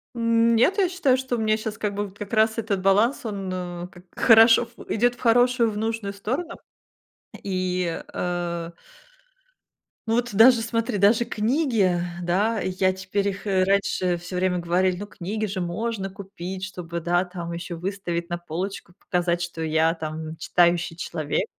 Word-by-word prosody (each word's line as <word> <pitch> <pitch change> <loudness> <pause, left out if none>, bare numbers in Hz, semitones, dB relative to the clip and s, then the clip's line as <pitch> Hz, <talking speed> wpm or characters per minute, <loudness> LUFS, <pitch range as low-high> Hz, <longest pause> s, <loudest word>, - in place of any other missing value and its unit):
М 230 0 +3
Нет, 345 - +3
я 385 - +3
считаю, 285 -8 +2
что 260 -1 -2
у - - -3
меня 215 0 +2
щас 215 0 -5
как 210 -1 -2
бы 205 +1 -2
вот 195 +1 -17
как 205 +1 -7
раз 220 +1 +3
этот 205 -4 -1
баланс, 210 +8 +2
он 200 -3 -4
а 175 -1 -5
как 175 -1 -15
хорошо 225 +1 +6
в - - -10
идёт 245 +3 +2
в - - -23
хорошую, 245 0 +4
в 205 - -6
нужную 220 -2 -2
сторону, 260 - -3 0.9
И 185 -3 -1
э. 170 -1 -3 1.4
Ну, 225 - +1
вот 240 0 0
даже, 230 +2 +7
смотри, 230 -1 -1
даже 220 +4 +4
книги, 220 - +1 0.2
да, 200 +6 +1
я 185 0 +1
теперь, 190 +2 -2
их 200 +2 -7
и - - 0
раньше, 185 -2 +1
всё 180 +2 -8
время 180 -1 +1
говорили, 180 +2 +1
ну, 205 +2 -6
книги 210 +3 -4
же 190 -1 -3
можно 195 +3 -3
купить, 190 -1 -7
чтобы, 175 -3 -5
да, 175 +2 +1
там, 175 -2 -7
ещё 170 0 -5
выставить 175 -2 -3
на 175 - -2
полочку, 175 +2 -5
п - - -50
показать, 175 -1 +1
что 170 -1 -4
я 160 +1 +2
там 155 0 -5
н 160 - -7
читающий 175 -1 +2
человек. 160 -3 -2
195 Hz, 175 wpm, -24 LUFS, 175-225 Hz, 1.4 s, даже